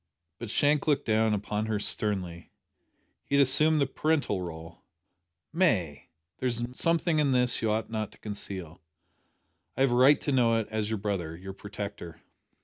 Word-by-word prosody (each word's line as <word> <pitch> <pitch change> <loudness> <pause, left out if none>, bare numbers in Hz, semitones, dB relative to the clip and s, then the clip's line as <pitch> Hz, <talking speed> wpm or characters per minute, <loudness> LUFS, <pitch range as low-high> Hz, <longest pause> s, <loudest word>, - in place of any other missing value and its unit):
But 115 - -6
Shank 145 +6 +2
looked 145 -2 +2
down 110 -1 +2
upon 105 +1 -3
her 110 -1 0
sternly. 95 -5 -2 0.7
He 140 - -2
had 140 - +6
assumed 155 +4 +4
the 140 - +3
parental 140 -8 0
role. 80 -1 -8 0.7
"May, 105 - 0 0.3
there 130 - -1
is 120 -1 -1
something 165 +2 +1
in 140 -3 +2
this 125 -1 +2
that - - -8
you 110 - 0
ought 110 +1 -2
not 110 -2 -3
to - - -16
conceal. 95 -5 -7 1.0
I - - -1
have 135 -2 +4
a - - +2
right 130 +4 +6
to 145 - -2
know 120 -4 +3
it, 110 - -4
as 110 -1 -2
your 110 - -1
brother 95 -6 -3
your 95 +3 -8
protector." 100 -3 -8
110 Hz, 175 wpm, -28 LUFS, 100-135 Hz, 1.0 s, had